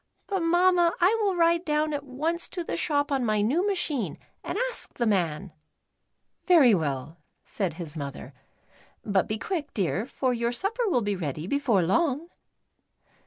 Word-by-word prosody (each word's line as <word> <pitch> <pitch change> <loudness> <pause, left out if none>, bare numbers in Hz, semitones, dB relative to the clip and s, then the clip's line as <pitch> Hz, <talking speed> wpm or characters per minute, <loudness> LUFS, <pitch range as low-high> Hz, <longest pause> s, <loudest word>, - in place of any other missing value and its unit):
But, 390 -2 -1
Mamma, 350 0 +3
I 365 +5 +4
will 395 -3 +1
ride 335 0 +3
down 305 -1 0
at 285 -1 -3
once 310 +6 -2
to 355 - -4
the - - -4
shop 290 -3 0
on 270 -2 +1
my 215 -2 +1
new 320 - +1
machine 340 - -2 0.3
and - - -4
ask - - -5
the 240 - 0
man." 185 -3 0 1.0
"Very 310 - +7
well," 150 -2 -2 0.2
said 185 -7 -3
his 165 -3 -7
mother, 140 -2 -7 0.4
" - - -31 0.3
but 200 -3 +1
be 215 - -2
quick, 300 - -4
dear, 195 - -1
for 260 -2 -1
your 235 0 -1
supper 440 - 0
will 250 -9 +2
be 205 -1 -1
ready 155 -3 -4
before 240 -5 +1
long." 295 - +1
270 Hz, 165 wpm, -26 LUFS, -, 1.0 s, Very